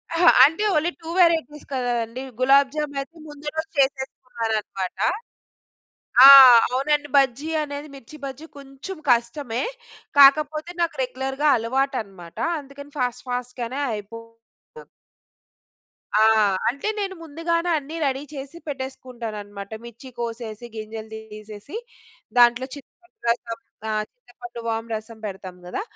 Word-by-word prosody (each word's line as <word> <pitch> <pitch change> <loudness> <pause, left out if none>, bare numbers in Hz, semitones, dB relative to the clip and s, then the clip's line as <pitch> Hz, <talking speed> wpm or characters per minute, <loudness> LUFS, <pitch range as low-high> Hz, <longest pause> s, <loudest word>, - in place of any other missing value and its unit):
అహ! 345 +2 +4 0.2
అంటే, 325 +9 +4
only 315 +3 +1
2 325 - -8
varieties 325 -4 +2
కదండీ. 245 -1 -2 0.2
గులాబ్ 270 +1 +5
జామయితే 295 +1 -4
ముందు 295 0 -12
రోజు 320 0 -3
చేసేసుకున్నారనమాట. 230 -8 -2 1.3
ఆ! - - +13 0.4
అవునండి. 290 +3 0
బజ్జీ 275 +2 +2
అనేది 290 0 -6
'మిర్చి 275 +2 -12
బజ్జీ' 275 +4 -7
కొంచుం 275 +7 -9
కష్టమే. 240 +1 0 0.6
కాకపోతే, 305 +3 +5
నాకు 335 - -1
రెగ్యులర్‌గా 265 +3 -1
అలవాటనమాట. 230 - -3 0.2
అందుకని 285 +1 -12
ఫాస్ట్, 245 -1 -2
ఫాస్ట్‌గానే 250 +1 -4
అయిపో 215 +2 -7 0.6
ద - - -12 1.3
ఆ! 215 - +5 0.5
అంటే 280 - -4
నేను 390 -2 -3
ముందుగానే 335 +2 -1
అన్నీ 300 +2 -7
రెడీ 270 0 -1
చేసి 280 +3 -8
పెట్టేసుకుంటానన్నమాట. 230 -7 -7
మిర్చి 235 +3 -11
కోసేసి 230 -1 -5
గింజలు 220 0 -7 0.2
తీసేసి 215 - -10 0.6
దాంట్లో 240 +1 +5
చింతపండు 350 +5 -17
రసం. 235 -1 -1 0.6
చింతపండు 365 - -11
వాం 225 0 -2
రసం 220 +1 -8
పెడతాం 190 -2 -7
కదా! 180 - -4
265 Hz, 110 wpm, -23 LUFS, 230-295 Hz, 1.3 s, ఆ